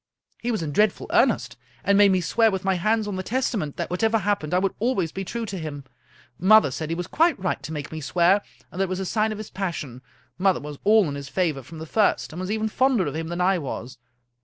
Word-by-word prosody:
He 240 - -2
was 220 -8 -1
in 150 - -3
dreadful 210 +6 +2
earnest, - - +2 0.3
and 200 - +3
made 200 -1 +6
me 185 -1 +2
swear, 225 +6 +3
with 190 -2 -3
my 190 - +3
hands 215 +4 +1
on 200 -2 -3
the - - -2
Testament, 215 - -2
that - - -3
whatever 220 +5 +2
happened 200 -7 -1
I 180 - +3
would 195 +1 +1
always 205 -8 0
be 195 - -4
true 230 +4 -4
to 195 -3 -5
him. 150 -3 -6 0.6
Mother 205 -4 +6
said 155 +4 -4
he 165 - -1
was 175 +1 -3
quite 330 - +2
right 185 -1 -2
to - - -7
make 150 -2 -5
me 160 0 -5
swear, 175 +7 +3 0.3
and 185 - -4
that - - +3
it - - -7
was 185 0 -2
a 190 - -2
sign 215 +3 0
of 215 - -4
his 215 -1 -8
passion. 160 -10 -4 0.4
Mother 190 0 +3
was 145 -1 -8
all 210 -2 +5
in 145 - -3
his 140 0 -7
favor 160 -7 0
from 160 +6 -12
the 160 - -6
first, 205 -1 +1
and 170 - -6
was 185 +1 -4
even 220 +1 0
fonder 250 -3 +2
of 145 0 -4
him 160 0 -3
than 175 +1 -3
I 185 0 +3
was. 130 -4 -6
185 Hz, 260 wpm, -24 LUFS, 160-215 Hz, 0.6 s, made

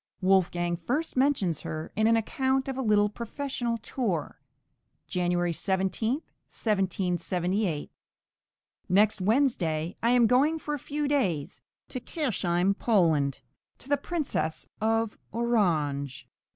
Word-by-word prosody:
Wolfgang 175 -2 +2
first 255 - -2
mentions 255 - +2
her 155 0 -5
in 215 +1 +3
an 230 0 +5
account 265 +4 0
of 270 - -3
a 265 - -2
little 210 -3 +4
professional 235 +2 -3
tour 215 - -3 0.6
(January 175 -1 0
17, 190 +6 0 0.4
1778) 185 -3 -1 1.0
Next 205 +2 +3
Wednesday 185 - +1
I 230 - +2
am 245 -1 +5
going 270 +7 +3
for 300 -1 -4
a 295 - -2
few 295 +2 -2
days 180 - 0 0.3
to 255 - -4
Kirchheim 200 - 0
Poland, 160 - +2 0.3
to 270 - -8
the 285 - +4
Princess 280 - -2 0.2
of 225 0 0
Orange 160 - 0
(p. - - -42
210 Hz, 120 wpm, -28 LUFS, 175-250 Hz, 1.0 s, an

